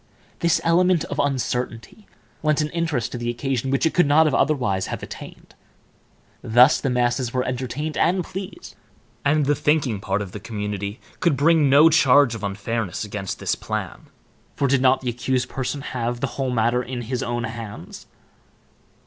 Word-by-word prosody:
This 170 -2 +2
element 175 0 +3
of - - -5
uncertainty 125 - -2 0.3
lent 155 0 +1
an 150 0 -1
interest 160 -8 -1
to 120 - -5
the 120 0 -2
occasion 130 +1 -2
which 135 +1 +1
it 160 - +1
could 175 -5 +3
not 155 +3 +5
otherwise 125 -12 +1
have - - -5
attained. - - -10 0.9
Thus, 125 +5 +5
the 135 - 0
masses 120 0 0
were 125 - +1
entertained 130 +5 -4
and 180 +2 +2
pleased, 190 - -8 0.5
and 145 +1 +2
the 145 - +3
thinking 145 -8 +1
part 100 0 -1
of 95 - -9
the 105 - -7
community 105 0 -5 0.2
could 165 -6 +2
bring 155 0 +4
no 145 +4 +7
charge 140 -5 +5
of 115 -2 -7
unfairness 100 +1 -3
against 105 -2 -5
this - - -1
plan, - - -5 0.5
for 140 - +1
did 135 0 +2
not 130 0 +4
the 125 - -2
accused 125 +1 -1
person 135 +2 -3
have 120 -3 -3
the - - 0
whole 135 -2 -2
matter 120 0 +1
in 125 0 -5
his 125 +2 -3
own 120 0 -2
hands? 110 -6 -8
130 Hz, 170 wpm, -22 LUFS, 115-145 Hz, 0.9 s, no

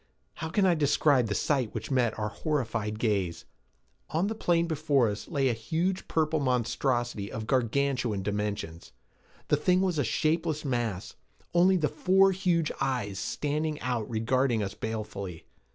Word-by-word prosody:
How 160 - -4
can 195 +4 +2
I 180 - +5
describe 145 -4 +3
the 105 - -2
sight 130 -7 0
which - - -5
met 125 -4 +1
our 105 0 -2
horrified 115 -9 -2
gaze? 100 -7 -1 0.6
On 165 +4 0
the 215 - -1
plain 170 -6 +1
before 150 -6 +2
us 105 0 -5
lay 135 -2 +1
a 125 - +2
huge 165 +12 -2
purple 160 -1 +1
monstrosity 120 -4 0
of 110 0 -5
gargantuan 125 -3 0
dimensions. 105 -5 -4 0.6
The 150 - +4
thing 180 +5 +2
was 180 -5 0
a - - +3
shapeless 155 -1 0
mass, 115 -6 -2 0.4
only 185 +2 +5
the 155 -3 +1
four 190 +3 +4
huge 175 -4 +1
eyes 105 -7 -1
standing 150 +1 -2
out 120 -4 -2
regarding 120 +1 +1
us 100 - -4
balefully. 105 -6 -5
130 Hz, 150 wpm, -28 LUFS, 110-160 Hz, 0.6 s, I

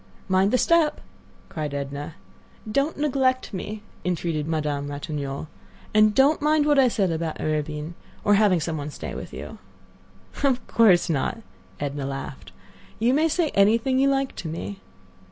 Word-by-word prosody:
"Mind 190 +1 +3
the 255 - +3
step!" 330 +1 +3 0.5
cried 150 -3 -4
Edna. 140 +2 -5 0.6
"Don't 280 +7 0
neglect 265 -4 +1
me," 210 +3 -5 0.2
entreated 165 -4 -1
Madame 150 -3 -1
Ratignolle; 145 0 -4 0.5
"and 215 0 +5
don't 285 +4 +4
mind 300 0 +3
what 295 -2 +4
I 260 - +6
said 195 -6 +1
about 160 -1 -3
Arobin, 155 +1 -2 0.3
or 205 - +4
having 200 -4 +4
some 160 0 -2
one 145 0 -4
to 150 - -8
stay - - -6
with - - -7
you." - - -8 0.8
"Of 260 -3 +2
course 200 -7 +4
not," 165 +8 -1 0.4
Edna 140 -1 -3
laughed. 135 -1 -7 0.5
"You 235 +3 +2
may 310 +3 +3
say 320 0 +1
anything 230 +6 +3
you 275 +1 +4
like 270 -1 0
to 170 - -5
me." 170 +5 -5
195 Hz, 155 wpm, -24 LUFS, -, 0.8 s, I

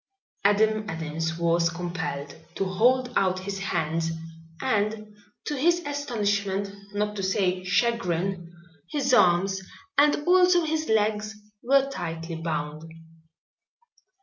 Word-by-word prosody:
Adam 215 +1 +3
Adams 160 0 -3
was 170 0 +2
compelled 170 -5 -4 0.2
to 195 - -1
hold 245 +7 +2
out 185 -1 +2
his 195 +1 -4
hands 165 -4 -1 0.5
and 210 +1 -1 0.3
to 295 - -2
his 345 +5 +2
astonishment, 205 -8 -1 0.2
not 210 0 -1
to 200 - -3
say 190 -1 0
chagrin, 185 -3 0 0.4
his 280 -3 0
arms 190 -2 +4 0.4
and 290 +1 +5
also 360 -1 +5
his 315 0 -1
legs 215 0 +1 0.3
were 275 +2 +3
tightly 165 -9 -5
bound. 155 -2 -3
200 Hz, 110 wpm, -26 LUFS, 170-235 Hz, 0.5 s, and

